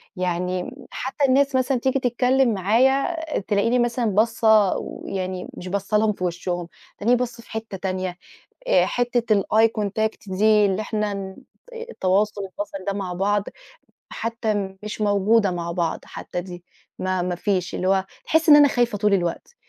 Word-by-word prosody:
يعني، 180 0 -2 0.2
حتى 270 +3 -1
الناس 275 +1 +3
مثلًا 260 0 +2
تيجي 265 +2 +1
تتكلم 250 0 +2
معايا، 255 - +2 0.2
تلاقيني 210 +5 +1
مثلًا 240 0 0
باصّة 220 -1 +3
ويعني 185 -1 -5
مش 180 - -7
باصة 200 +3 0
لهم 215 0 +2
في 185 - -7
وشهم، 175 0 -3 0.3
تلاقيني 240 +4 +3
باصّة 235 -2 -4
في - - -18
حتة 220 -3 -5
تانية، 185 -1 -3 0.5
آآ - - +4
حتة 240 -2 +1
الeye 220 +3 +3
contact 220 +2 -1 0.2
دي، 215 0 +5
اللي 195 +1 0
إحنا 210 -1 -2
ن 190 -1 -6 0.4
التواصل 210 - -1
البصري 195 0 -7
ده 200 - +1
مع 195 -3 -4
بعض، 200 +3 +1 0.7
حتى 215 -4 -3
مش 215 0 -6
موجودة 205 0 +3
مع 170 -1 -3
بعض، 170 -2 -1
حتى 180 - -6
دي 175 -1 -10 0.4
ما 185 -1 -1
ما 180 0 -2
فيش، 180 -1 -1
اللي 185 - -2
هو 190 0 +2 0.2
تحسِّ 320 0 +2
إن 295 - +10
أنا 290 -1 +8
خايفة 240 -5 0
طول 210 0 +2
الوقت، 180 - -2
205 Hz, 160 wpm, -23 LUFS, 185-235 Hz, 0.7 s, إن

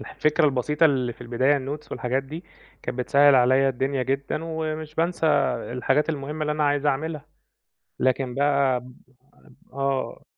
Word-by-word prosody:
الفكرة 155 +1 0
البسيطة 150 +3 +2
اللي 130 -5 0
في - - -22
البداية 130 +4 +1
الnotes 145 +3 -7
والحاجات 130 +1 -1
دي، 155 +6 -9 0.4
كانت 125 - -5
بتسهِّل 140 +2 +5
عليّا 130 +2 +4
الدُنيا 135 +1 -1
جدًا 140 +4 -2
ومش 155 -1 -4
بانسى 165 0 0 0.5
الحاجات 125 +5 +1
المهمة 150 0 -4
اللي 150 0 0
أنا 150 0 0
عايز 145 0 +1
أعمِلها. 150 +2 -2 0.7
لكن 130 -1 0
بقى 140 -2 +2
ب 125 0 -14 0.8
آه. 135 -1 -2
140 Hz, 145 wpm, -24 LUFS, 130-150 Hz, 0.8 s, بتسهِّل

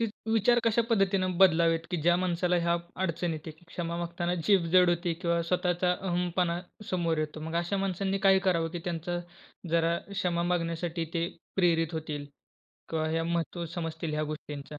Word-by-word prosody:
वि 230 - +2 0.3
विचार 235 +2 +4
कशा 230 +1 +3
पद्धतीने 195 -3 +3 0.2
बदलावेत, 165 -2 +4
की 180 - 0
ज्या 175 +2 +4
माणसाला 180 0 +1
ह्या 170 0 +3 0.3
अडचण 170 0 -1
येते, 160 0 -6 0.2
क्षमा 170 0 -4
मागताना 175 +1 -2
जीभ 195 -4 +5
जड 180 -1 +6
होते 175 0 0
किंवा 170 -1 +2
स्वतःचा 180 0 +2
अहंपणा 175 -1 -1 0.3
समोर 170 -3 0
येतो. 155 0 -3
मग 160 +1 -5
अशा 185 +4 -2
माणसांनी 195 +1 -1
काय 190 - +7
करावं, 165 -2 +2
की 175 - -4
त्यांचं 175 0 -2 0.5
जरा 170 0 +2
क्षमा 180 -4 0
मागण्यासाठी 170 -1 -1
ते 170 +1 0 0.3
प्रेरित 165 -3 +2
होतील 150 -2 -4 0.6
किंवा 155 -1 0
ह्या 165 +1 0
महत्त्व 170 +1 -2
समजतील 165 -2 -3
ह्या 155 - 0
गोष्टींच्या? 150 -1 -8
170 Hz, 160 wpm, -29 LUFS, 165-180 Hz, 0.6 s, काय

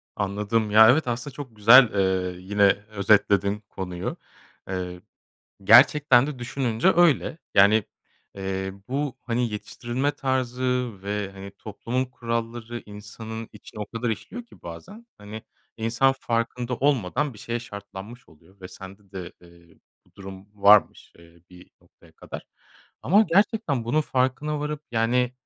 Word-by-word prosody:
Anladım. 105 +2 -1
Ya, 110 +1 +8
evet 145 +1 +3
aslında 125 +4 -4
çok 135 -6 -9
güzel, 115 +4 +8
eee, 95 -2 0
yine 100 +2 0 0.3
özetledin 100 0 +2
konuyu. 90 -1 -5 0.5
Eee, 90 -1 -5 0.6
gerçekten 125 +3 +6
de 150 -3 -6
düşününce 120 +5 0
öyle. 165 -2 +3 0.2
Yani, 105 +2 +5 0.5
eee, 95 0 -4 0.2
bu, 140 0 -2
hani, 120 0 -1
yetiştirilme 120 +6 -3
tarzı 125 -2 -1
ve, 100 0 -3
hani, 100 0 -10
toplumun 115 +4 -3
kuralları 115 -1 -5
insanın 110 +2 -9
içine 105 0 -12
o 105 - -4
kadar 115 +1 -3
işliyor 240 - -6
ki - - -20
bazen, 195 - -10
hani, 105 +1 -9 0.3
insan 120 +4 +2
farkında 120 +1 -2
olmadan 135 -1 0
bir - - -14
şeye 120 +2 -4
şartlanmış 100 +2 -10
oluyor 85 +6 -23
ve 90 - -9
sende 95 +1 -13
de, 90 -2 -7
eee, 85 -1 -20 0.3
bu - - -31
durum 95 0 -11
varmış, 105 0 +4
eee, 85 0 -20
bir 90 0 -16
noktaya - - -24
kadar. - - -10 0.6
Ama 205 +5 +5
gerçekten 195 - +1
bunun 145 +7 +1
farkına 145 +2 -1
varıp. 150 0 -4
Yani, 120 +2 +1
115 Hz, 135 wpm, -24 LUFS, 100-130 Hz, 0.6 s, Ya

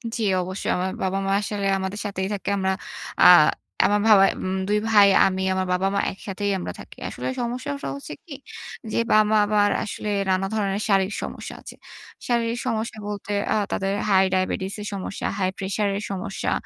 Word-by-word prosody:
জি, 235 - -3 0.2
অবশ্যই। 185 +2 -3
আমার 185 +1 -1
বাবা-মা 195 +1 -1
আসলে 205 -1 -2
আমাদের 190 +2 -4
সাথেই 190 -2 -2
থাকে। 200 - -4
আমরা 190 -1 +1 0.5
আ - - +10 0.6
আমার 205 +1 +3
বাসায়, 195 -3 +7
উম 185 0 -1
২ 210 0 +3
ভাই, 205 -2 +7 0.2
আমি, 190 0 0
আমার 185 0 0
বাবা-মা, 195 +2 +1
একসাথেই 200 +1 -4
আমরা - - -4
থাকি। - - -12
আসলে - - -5
সমস্যা 250 +4 -3
সহ - - -3
হচ্ছে 280 - -8
কি, 330 - -9 0.6
যে - - -1 0.2
বাবা 215 0 +4
আবার 205 0 +3
আসলে 210 0 -5 0.2
নানা 190 0 +2
ধরনের 200 -1 -1
শারীরিক 195 0 +2
সমস্যা - - -6
আছে। - - -10 0.5
শারীরিক 235 0 0
সমস্যা 225 -1 -2
বলতে 205 0 -5 0.2
আ - - +1 0.2
তাদের 195 0 -1 0.2
হাই-ডায়াবেটিস 190 0 +1
এর - - -6
সমস্যা, 195 0 -4
হাই-প্রেশার 195 +2 -1
এর 205 - -5
সমস্যা, 195 +1 -3
200 Hz, 165 wpm, -24 LUFS, 190-210 Hz, 0.6 s, আ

